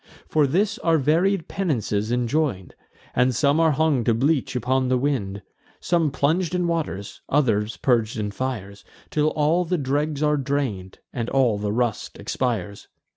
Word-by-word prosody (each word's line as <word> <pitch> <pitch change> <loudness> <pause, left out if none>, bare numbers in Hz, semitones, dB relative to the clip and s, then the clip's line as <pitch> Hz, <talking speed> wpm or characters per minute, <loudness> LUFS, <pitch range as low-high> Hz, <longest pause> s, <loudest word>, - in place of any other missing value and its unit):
For 150 -2 +2
this 205 - 0
are 165 -1 +2
various 165 +6 +2
penances 115 - -1
enjoin'd; 120 - -1 0.4
And 125 0 +2
some 140 +5 +3
are 160 -2 +4
hung 145 -4 +2
to 115 - +3
bleach 135 +2 +1
upon 130 +1 +1
the 130 0 +2
wind, 120 -8 -2 0.4
Some 170 -3 +1
plung'd 165 +6 0
in 180 -1 0
waters, 160 - -3
others 115 -7 +1
purg'd 115 -4 +1
in 105 -1 -2
fires, 105 -5 -5 0.3
Till 150 0 +2
all 155 +3 +2
the 180 +1 -1
dregs 145 +1 -1
are 150 0 +3
drain'd, 130 -10 -2 0.2
and 115 -1 -3
all 125 -6 +2
the 105 0 -2
rust 120 0 -2
expires. 105 -6 -3
135 Hz, 155 wpm, -23 LUFS, 115-155 Hz, 0.4 s, are